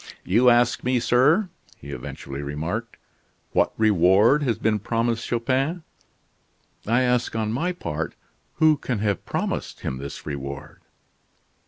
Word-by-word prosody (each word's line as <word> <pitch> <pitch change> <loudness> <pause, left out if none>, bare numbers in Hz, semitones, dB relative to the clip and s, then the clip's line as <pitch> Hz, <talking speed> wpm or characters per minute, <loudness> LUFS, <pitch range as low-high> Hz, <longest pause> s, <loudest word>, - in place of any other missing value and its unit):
"You 115 +7 +5
ask 120 0 +3
me, 125 0 +2
sir," 150 - +3 0.3
he 70 - -10
eventually 70 0 -7
remarked, 80 +11 -4 0.5
"what - - +2
reward 105 - +4
has 120 -7 0
been 110 -1 +1
promised 115 +2 -1
Chupin? 135 +8 0 1.0
I 120 +3 +3
ask 125 -2 +1
on 110 -1 -1
my 170 +9 0
part 80 - -4 0.4
who 155 -1 +4
can 130 -4 -3
have 100 -2 -1
promised - - -3
him 65 - -3
this 70 +1 -8
reward?" 70 0 -6
115 Hz, 130 wpm, -24 LUFS, 90-125 Hz, 1.0 s, You